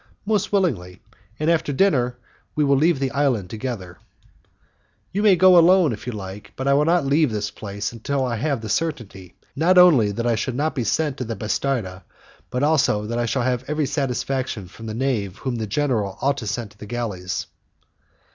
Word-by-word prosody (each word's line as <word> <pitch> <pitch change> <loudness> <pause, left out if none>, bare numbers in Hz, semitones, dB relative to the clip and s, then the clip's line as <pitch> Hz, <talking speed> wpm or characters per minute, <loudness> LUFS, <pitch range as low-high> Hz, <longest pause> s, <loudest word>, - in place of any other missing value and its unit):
"Most 210 -1 0
willingly, 110 - 0 0.4
and 155 - -1
after 165 -3 +2
dinner 130 -7 +2 0.4
we 150 - +2
will 140 -1 +3
leave 160 +3 +3
the 135 -1 -1
island 130 -10 0
together." 110 -6 -6 1.1
"You 200 - -1
may 210 -3 +6
go 180 0 +7
alone, 175 -4 +5
if 110 - -9
you - - -1
like; 100 -1 -8
but 130 - -4
I 140 - +4
will 145 +2 +3
not 170 -2 +2
leave 145 0 +2
this 105 -1 -3
place 100 -1 -5
until 135 +4 -2
I 120 -2 -2
have 140 0 -1
the 110 - -6
certainty, 110 - -3 0.2
not 175 +5 +3
only 150 -13 +6
that 115 +4 -3
I 120 - +2
shall 120 +2 -2
not 150 +4 0
be 125 - -2
sent 150 +4 0
to - - -3
the 115 -1 -4
'bastarda', 110 -3 -2 0.5
but 125 +2 -2
also 140 -9 +2
that 115 +2 -2
I 120 - 0
shall 130 +2 0
have 125 0 0
every 150 0 0
satisfaction 130 - -2
from 110 +5 -11
the 110 - -5
knave 110 -7 -1
whom 125 0 -3
the 110 -1 -3
general 110 -5 -1
ought 140 +1 +1
to 115 -6 -5
send 105 +1 -3
to 100 - -23
the 105 - -9
galleys." 100 -7 -3
125 Hz, 200 wpm, -22 LUFS, 110-150 Hz, 1.1 s, go